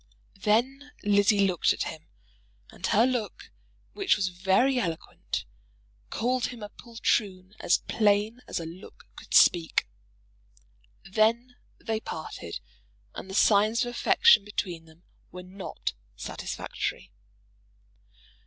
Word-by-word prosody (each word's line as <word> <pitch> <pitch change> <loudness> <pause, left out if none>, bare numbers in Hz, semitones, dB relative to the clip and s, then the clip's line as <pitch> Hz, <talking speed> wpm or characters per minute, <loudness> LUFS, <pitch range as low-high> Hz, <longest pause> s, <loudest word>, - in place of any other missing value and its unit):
Then 265 +7 0
Lizzie 205 0 +4
looked 180 -3 +2
at - - -3
him, - - -8 0.6
and - - -4
her 225 +4 +4
look, 255 - -3 0.4
which 395 -2 +2
was 190 -3 0
very 195 +9 +2
eloquent, 165 -7 -4 0.6
called 250 +2 0
him 240 -3 -9
a 205 - -6
poltroon 205 -5 -2
as 175 - +2
plain 215 +2 +1
as - - -3
a 165 - -6
look 170 +4 -12
could - - -5
speak. 170 -2 +5 1.2
Then 225 +5 +1 0.2
they 220 -1 -2
parted, 155 - -7 0.5
and 190 - -8
the 190 - -5
signs 215 +4 +4
of 240 - -4
affection 245 - +5
between 180 -5 -4
them 160 +2 -20 0.3
were 180 0 -9
not 190 +1 -6 0.2
satisfactory. - - -5
210 Hz, 115 wpm, -27 LUFS, 185-240 Hz, 1.2 s, speak